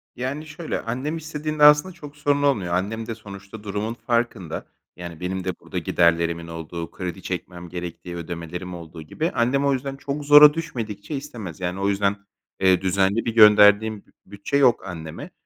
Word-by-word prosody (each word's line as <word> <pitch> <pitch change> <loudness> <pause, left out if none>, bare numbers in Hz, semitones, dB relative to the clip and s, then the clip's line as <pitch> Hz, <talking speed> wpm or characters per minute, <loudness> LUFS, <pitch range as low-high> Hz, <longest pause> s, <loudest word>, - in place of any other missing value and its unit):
Yani, 135 +5 -4
şöyle, 155 +2 -5
annem 130 +8 -3
istediğinde 155 -1 -3
aslında 150 +5 +6
çok 150 -3 -12
sorun 145 0 +1
olmuyor, 100 -12 +1
annem 110 +5 -2
de 115 - -4
sonuçta 100 0 -11
durumun 105 +3 -3
farkında. 115 -8 -2 0.3
Yani 85 -2 -8
benim 95 +1 -3
de 90 -2 -4
burada - - -8
giderlerimin 85 -1 +1
olduğu, 85 0 -7
kredi 90 0 -6
çekmem 90 -1 -6
gerektiği, 85 0 -7
ödemelerim 85 +1 -6
olduğu 80 -1 -9
gibi. 155 - -3
Annem 135 +4 +1
o 140 - +3
yüzden 135 +1 -3
çok 140 +1 -5
zora 145 0 +9
düşmedikçe 120 -6 -5
istemez. 120 - -7
Yani 90 +1 -3
o 100 +1 +1
yüzden, 100 0 +1 0.4
eee, 95 -1 +4
düzenli 95 +3 +1
bir 115 -1 -2
gönderdiğim 105 0 +6
b 95 - -28
bütçe 100 +8 -2
yok 125 -7 +3
anneme 80 -3 -8
105 Hz, 165 wpm, -23 LUFS, 90-140 Hz, 0.4 s, zora